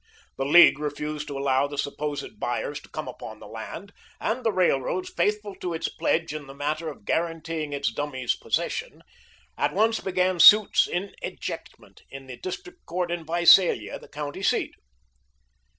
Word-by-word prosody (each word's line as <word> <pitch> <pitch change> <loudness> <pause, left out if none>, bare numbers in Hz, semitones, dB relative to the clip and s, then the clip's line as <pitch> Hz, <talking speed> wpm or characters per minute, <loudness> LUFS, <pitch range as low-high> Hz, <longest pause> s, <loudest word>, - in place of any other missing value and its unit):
The 135 - -2
League 150 +1 +7
refused 150 0 -4
to 140 -2 -5
allow 135 0 +2
the 145 0 -8
supposed 145 +1 -4
buyers - - -2
to - - -18
come - - -6
upon - - -8
the - - -12
land, 200 +2 -8 0.3
and 245 +3 -2
the 225 - +2
Railroad, 185 - +1
faithful 210 - -1
to 175 -2 -4
its 165 - -2
pledge 160 -2 -1
in 150 -2 -7
the 135 - -11
matter 155 +3 -2
of 140 -9 -11
guaranteeing 165 -2 -2
its 140 -3 -1
dummies 130 -1 -2
possession, - - -3 0.6
at 145 +3 0
once 225 +2 +2
began 185 -1 0
suits 210 +4 +8
in 190 +3 -3
ejectment - - -7
in 135 0 -10
the 130 -2 -9
district 360 - -8
court 175 0 -2
in 175 -1 -3
Visalia, 170 +2 +5
the - - -15
county 150 +4 -6
seat. - - +1
160 Hz, 165 wpm, -25 LUFS, 145-185 Hz, 0.6 s, suits